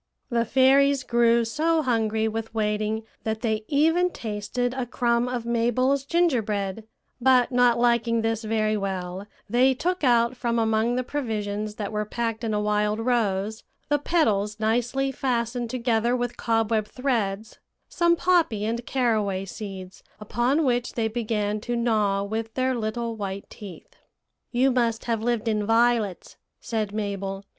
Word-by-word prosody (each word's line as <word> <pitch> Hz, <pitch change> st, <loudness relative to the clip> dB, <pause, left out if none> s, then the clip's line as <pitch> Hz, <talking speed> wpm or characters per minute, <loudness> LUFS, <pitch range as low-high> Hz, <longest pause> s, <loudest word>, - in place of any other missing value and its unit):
"The 235 Hz, -1 st, +1 dB
fairies 270 Hz, +2 st, +4 dB
grew 235 Hz, -1 st, +3 dB
so 315 Hz, +6 st, +1 dB
hungry 220 Hz, -3 st, +1 dB
with 225 Hz, 0 st, -5 dB
waiting 215 Hz, 0 st, -1 dB, 0.2 s
that 220 Hz, 0 st, -2 dB
they 220 Hz, -2 st, -1 dB
even 325 Hz, +5 st, +3 dB
tasted 230 Hz, -, -3 dB
a 255 Hz, -2 st, -3 dB
crumb 240 Hz, -1 st, +1 dB
of 245 Hz, -2 st, -3 dB
Mabel's 245 Hz, +4 st, +1 dB
gingerbread; 225 Hz, -, 0 dB, 0.3 s
but 255 Hz, 0 st, +4 dB
not 245 Hz, -1 st, +4 dB
liking 235 Hz, -1 st, +2 dB
this 225 Hz, 0 st, -1 dB
very 215 Hz, 0 st, 0 dB
well, 190 Hz, -1 st, -4 dB, 0.2 s
they 255 Hz, +4 st, +3 dB
took 360 Hz, +5 st, -2 dB
out 240 Hz, -1 st, +3 dB
from 235 Hz, -1 st, -1 dB
among 225 Hz, +1 st, +1 dB
the 255 Hz, -, 0 dB
provisions 215 Hz, -6 st, -3 dB
that 205 Hz, -1 st, -4 dB
were 210 Hz, 0 st, -1 dB
packed 230 Hz, +1 st, -3 dB
in 225 Hz, -, -1 dB
a 210 Hz, -, 0 dB
wild 210 Hz, 0 st, 0 dB
rose, 220 Hz, -3 st, 0 dB, 0.3 s
the 290 Hz, 0 st, +2 dB
petals 215 Hz, -, +1 dB
nicely 245 Hz, +5 st, 0 dB
fastened 240 Hz, -2 st, -2 dB
together 235 Hz, -1 st, +1 dB
with 245 Hz, -1 st, -2 dB
cobweb 225 Hz, -2 st, 0 dB
threads, 225 Hz, -5 st, -2 dB, 0.3 s
some 340 Hz, -1 st, +2 dB
poppy 330 Hz, -, +2 dB
and 230 Hz, +2 st, -3 dB
caraway 215 Hz, -7 st, 0 dB
seeds, 190 Hz, -2 st, -8 dB, 0.2 s
upon 240 Hz, +8 st, 0 dB
which 245 Hz, -1 st, 0 dB
they 225 Hz, -2 st, 0 dB
began 215 Hz, -2 st, -2 dB
to 240 Hz, +2 st, -3 dB
gnaw 215 Hz, -4 st, +1 dB
with 220 Hz, +2 st, -4 dB
their 260 Hz, 0 st, +1 dB
little 230 Hz, 0 st, -3 dB
white 200 Hz, -2 st, -5 dB
teeth. 190 Hz, -6 st, -11 dB, 0.5 s
"'You 255 Hz, +2 st, +3 dB
must 235 Hz, -3 st, 0 dB
have 230 Hz, -2 st, -1 dB
lived 235 Hz, -1 st, -1 dB
in 215 Hz, -2 st, +1 dB
violets,' 225 Hz, -3 st, +1 dB, 0.2 s
said 220 Hz, -4 st, -3 dB
Mabel. 200 Hz, -2 st, -4 dB
230 Hz, 150 wpm, -25 LUFS, 215-245 Hz, 0.5 s, fairies